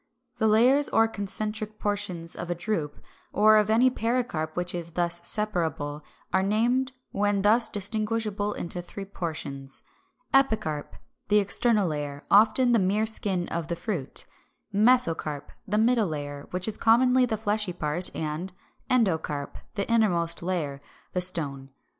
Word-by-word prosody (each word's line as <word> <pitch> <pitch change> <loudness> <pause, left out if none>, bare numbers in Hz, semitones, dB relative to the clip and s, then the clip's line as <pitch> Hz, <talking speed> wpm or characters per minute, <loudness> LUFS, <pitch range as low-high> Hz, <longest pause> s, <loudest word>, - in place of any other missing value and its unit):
The 220 - +3
layers 250 +7 +5
or 225 - +4
concentric 215 +1 -4
portions 200 -6 -3
of 175 - -6
a 175 - -1
drupe, 170 -5 -3 0.3
or 215 +1 +5
of 210 0 +2
any 240 +4 +4
pericarp 225 -11 -2
which 180 0 -2
is 170 -1 -5
thus 175 0 +3
separable, 165 -8 0 0.3
are 190 - +3
named, 240 +6 +1 0.2
when 205 -1 0
thus 220 +3 +4
distinguishable 210 0 -2
into 175 +1 -2
three 195 +3 -8
portions, 140 -7 -6 0.5
Epicarp, 220 - +1 0.3
the 210 - +4
external 210 0 +2
layer, 145 -2 -4
often 225 +5 +5
the 235 - +4
mere 200 +3 +1
skin 195 -5 0
of 170 -2 -3
the 170 - -2
fruit, 170 - -3 0.5
Mesocarp, 195 - +1 0.2
the 210 +1 0
middle 225 -1 +3
layer, 145 -2 -6
which 180 +2 -3
is 220 - -1
commonly 250 +2 +4
the 220 - -2
fleshy 210 -2 -1
part, 170 +2 -2
and 160 +4 -4 0.4
Endocarp, 160 - 0 0.2
the 200 -1 -2
innermost 180 -8 +1
layer, 160 -6 -3 0.3
the 180 - 0
stone. 145 -7 0
200 Hz, 140 wpm, -26 LUFS, 170-220 Hz, 0.5 s, layers